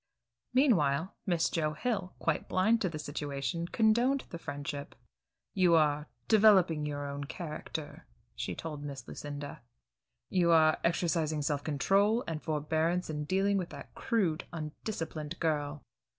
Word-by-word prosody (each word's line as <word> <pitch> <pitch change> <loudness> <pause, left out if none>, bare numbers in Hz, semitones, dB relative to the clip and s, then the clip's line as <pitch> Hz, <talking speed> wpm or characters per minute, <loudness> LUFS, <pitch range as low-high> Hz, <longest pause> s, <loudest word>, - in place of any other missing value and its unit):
Meanwhile 185 - +3
Miss 175 -3 +2
Joe 155 -2 0
Hill, 195 +1 -2
quite - - -1
blind 220 +5 +3
to 185 - +1
the 160 - -5
situation, 145 +3 -3
condoned 235 +7 +3
the 170 - -6
friendship. 145 -1 -5 0.6
"You 180 -4 +4
are 150 -1 +2 0.2
developing 190 -8 +5
your 145 -1 -3
own 140 0 -4
character," 155 -1 -6 0.3
she - - -3
told 150 -3 -6
Miss 140 -4 -7
Lucinda. 145 0 -7 0.7
"You 175 -2 +3
are 160 -1 +5
exercising 165 -3 +1
self 145 -1 -1
control 200 - +2
and 160 -2 -3
forbearance 160 +3 0
in 150 -1 -3
dealing 195 +4 +2
with 180 - -4
that - - -10
crude, 180 -9 0
undisciplined 160 -1 -5
girl. 150 -3 -1
160 Hz, 135 wpm, -31 LUFS, 150-185 Hz, 0.7 s, developing